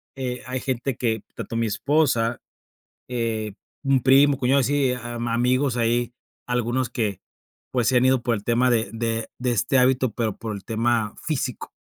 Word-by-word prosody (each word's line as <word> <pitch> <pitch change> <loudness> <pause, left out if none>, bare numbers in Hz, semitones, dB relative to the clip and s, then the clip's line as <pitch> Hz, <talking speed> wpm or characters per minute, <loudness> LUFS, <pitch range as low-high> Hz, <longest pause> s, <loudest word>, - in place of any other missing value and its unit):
eh, 125 -2 -4
hay 130 0 -2
gente 130 0 -2
que 110 -3 0
tanto 115 - -6
mi 115 0 +1
esposa, 120 0 +1 0.7
eh, 115 -4 -2 0.3
un 135 -3 +2
primo, 135 +1 +5
cuñado 135 +1 +3
así, 135 0 +2
am 120 -1 -5
amigos 125 +3 +1
ahí, 120 0 +1 0.3
algunos 125 +1 0
que, 105 -6 -2 0.5
pues, 125 -3 +1
se 130 - +4
han 125 - +3
ido 130 -1 +3
por 120 -1 +1
el 100 - -6
tema 120 +2 +2
de 115 -4 +1
de 115 0 -2
de 125 0 0
este 125 +3 +2
hábito, 130 -1 +3
pero 110 -3 -2
por 110 -2 -5
el 100 - -9
tema 115 -1 0
físico. 135 -6 -3
120 Hz, 170 wpm, -24 LUFS, 115-130 Hz, 0.7 s, primo